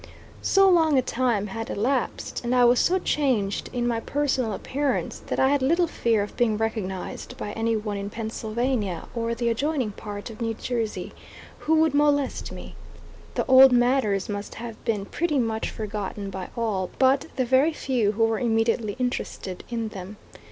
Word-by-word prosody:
So 390 Hz, 0 st, +4 dB
long 325 Hz, -6 st, +4 dB
a 260 Hz, -, +3 dB
time 235 Hz, -5 st, 0 dB
had 225 Hz, +3 st, -5 dB
elapsed 250 Hz, +5 st, -1 dB
and 240 Hz, +1 st, 0 dB
I 245 Hz, -1 st, +6 dB
was 240 Hz, +1 st, +5 dB
so 370 Hz, -, +3 dB
changed 250 Hz, -, 0 dB
in 240 Hz, -1 st, -1 dB
my 235 Hz, -1 st, 0 dB
personal 265 Hz, -3 st, 0 dB
appearance 275 Hz, +7 st, -2 dB
that -, -, -2 dB
I 265 Hz, -, +4 dB
had 285 Hz, 0 st, +2 dB
little 335 Hz, +7 st, +3 dB
fear 230 Hz, -9 st, +1 dB
of 205 Hz, -, -8 dB
being 225 Hz, -4 st, +2 dB
recognized 215 Hz, -4 st, -4 dB
by 205 Hz, -, -5 dB
any 225 Hz, +1 st, 0 dB
one 210 Hz, -1 st, -3 dB
in 200 Hz, 0 st, -4 dB
Pennsylvania 220 Hz, -3 st, -2 dB
or 230 Hz, -1 st, -1 dB
the 235 Hz, 0 st, -1 dB
adjoining 260 Hz, -1 st, 0 dB
part 205 Hz, +2 st, -7 dB
of 220 Hz, -, -11 dB
New 225 Hz, -1 st, -1 dB
Jersey, 230 Hz, -2 st, -3 dB, 0.5 s
who 320 Hz, -, +2 dB
would 320 Hz, -2 st, +3 dB
molest 285 Hz, -1 st, +1 dB
me. -, -, -9 dB, 0.6 s
The -, -, 0 dB
old 260 Hz, 0 st, +8 dB
matters 245 Hz, -5 st, +2 dB
must 205 Hz, -1 st, -5 dB
have 230 Hz, -1 st, -8 dB
been 210 Hz, -3 st, 0 dB
pretty 310 Hz, +5 st, -1 dB
much 225 Hz, -3 st, 0 dB
forgotten 205 Hz, -2 st, -5 dB
by 185 Hz, -1 st, -6 dB
all 205 Hz, -6 st, -1 dB
but 265 Hz, +1 st, +3 dB
the 255 Hz, -, +1 dB
very 265 Hz, +6 st, +4 dB
few 245 Hz, -8 st, 0 dB
who 225 Hz, +2 st, +1 dB
were 225 Hz, -1 st, 0 dB
immediately 225 Hz, -2 st, +1 dB
interested 245 Hz, -7 st, -3 dB
in 230 Hz, -2 st, -2 dB
them. 195 Hz, 0 st, -8 dB
230 Hz, 175 wpm, -25 LUFS, 210-265 Hz, 0.6 s, old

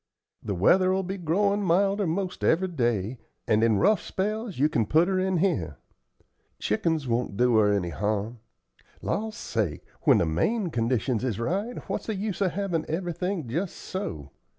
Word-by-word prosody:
The 100 Hz, -3 st, -3 dB
weather'll 185 Hz, -, +3 dB
be 190 Hz, +1 st, -4 dB
growin' 200 Hz, +5 st, +1 dB
milder 195 Hz, +2 st, +2 dB
'most 185 Hz, +3 st, -2 dB
every 185 Hz, +3 st, +3 dB
day, 120 Hz, -, -1 dB, 0.3 s
and 110 Hz, 0 st, +3 dB
in 110 Hz, -3 st, +4 dB
rough 205 Hz, -, +3 dB
spells 215 Hz, +1 st, -3 dB
you 145 Hz, +3 st, +4 dB
can 115 Hz, -8 st, 0 dB
put 160 Hz, +8 st, +4 dB
her 190 Hz, -1 st, +1 dB
in 185 Hz, -1 st, +1 dB
here. 95 Hz, -, 0 dB, 0.8 s
Chickens 150 Hz, +6 st, 0 dB
won't 115 Hz, -4 st, -1 dB
do 125 Hz, 0 st, +3 dB
her 105 Hz, -1 st, +4 dB
any 100 Hz, -4 st, 0 dB
harm. 105 Hz, +5 st, -2 dB, 0.6 s
Law 220 Hz, +1 st, -1 dB
sakes! 105 Hz, -, -3 dB, 0.2 s
when -, -, +5 dB
the -, -, +2 dB
main 180 Hz, -, 0 dB
conditions 120 Hz, 0 st, 0 dB
is 120 Hz, -6 st, -1 dB
right, 200 Hz, -, -2 dB
what's -, -, -3 dB
the 220 Hz, -, -1 dB
use 200 Hz, 0 st, -3 dB
of 185 Hz, -3 st, +1 dB
havin' 185 Hz, -5 st, -1 dB
everything 175 Hz, -1 st, -2 dB
jes' 170 Hz, +10 st, -2 dB
so? 75 Hz, -, -6 dB
165 Hz, 165 wpm, -27 LUFS, -, 0.8 s, when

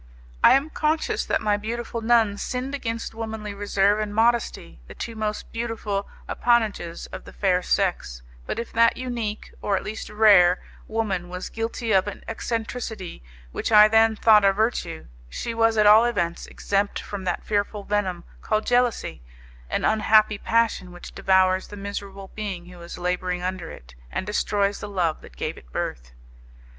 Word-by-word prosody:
I -, -, +8 dB
am 280 Hz, +4 st, +2 dB
conscious 310 Hz, +1 st, 0 dB
that -, -, 0 dB
my 210 Hz, -1 st, +2 dB
beautiful 230 Hz, +2 st, -4 dB
nun 225 Hz, -3 st, +3 dB
sinned 255 Hz, +2 st, -3 dB
against 230 Hz, -5 st, -4 dB
womanly 220 Hz, -2 st, -5 dB
reserve 205 Hz, 0 st, +2 dB
and 210 Hz, -1 st, -3 dB
modesty, 230 Hz, -, +1 dB
the -, -, -11 dB
two 230 Hz, -, -6 dB
most 215 Hz, -1 st, -4 dB
beautiful 225 Hz, -4 st, -3 dB, 0.2 s
appanages 220 Hz, -8 st, 0 dB
of -, -, -7 dB
the -, -, -12 dB
fair 185 Hz, -2 st, +1 dB
sex, 175 Hz, -, -1 dB, 0.2 s
but -, -, -3 dB
if 235 Hz, -, -5 dB
that 230 Hz, 0 st, +4 dB
unique, 235 Hz, -4 st, -4 dB
or 200 Hz, -1 st, +1 dB
at -, -, -4 dB
least 215 Hz, +1 st, -6 dB
rare, 200 Hz, -5 st, +6 dB, 0.3 s
woman 200 Hz, -6 st, -2 dB
was 180 Hz, +1 st, -6 dB
guilty 225 Hz, 0 st, -3 dB
of 190 Hz, 0 st, +3 dB
an 205 Hz, -, -7 dB
eccentricity 225 Hz, -, -4 dB, 0.3 s
which -, -, -3 dB
I 210 Hz, -1 st, +9 dB
then 220 Hz, 0 st, +4 dB
thought 215 Hz, -1 st, +5 dB
a 195 Hz, -, +6 dB
virtue, 215 Hz, -, -1 dB, 0.2 s
she 230 Hz, -, -4 dB
was 225 Hz, -1 st, +2 dB
at 210 Hz, -, +4 dB
all 215 Hz, +3 st, +8 dB
events 175 Hz, -8 st, -1 dB
exempt 200 Hz, 0 st, -1 dB
from 200 Hz, -2 st, -6 dB
that 175 Hz, -, -2 dB
fearful 205 Hz, 0 st, -1 dB
venom 190 Hz, -4 st, -1 dB, 0.2 s
called 215 Hz, 0 st, 0 dB
jealousy 245 Hz, -, +1 dB, 0.5 s
an -, -, -1 dB
unhappy 215 Hz, -1 st, +4 dB
passion 225 Hz, -5 st, +1 dB
which 175 Hz, 0 st, -11 dB
devours 185 Hz, 0 st, +2 dB
the 205 Hz, -, -10 dB
miserable 200 Hz, -1 st, -7 dB
being 195 Hz, -5 st, -5 dB
who 180 Hz, -1 st, -13 dB
is 170 Hz, -, -8 dB
labouring 180 Hz, 0 st, -2 dB
under 185 Hz, -2 st, -3 dB
it, -, -, -12 dB, 0.2 s
and -, -, -3 dB
destroys 205 Hz, -1 st, 0 dB
the 205 Hz, -, -6 dB
love 175 Hz, -5 st, -1 dB
that -, -, -15 dB
gave -, -, -4 dB
it -, -, -22 dB
birth. -, -, -4 dB
210 Hz, 170 wpm, -24 LUFS, 185-225 Hz, 0.5 s, I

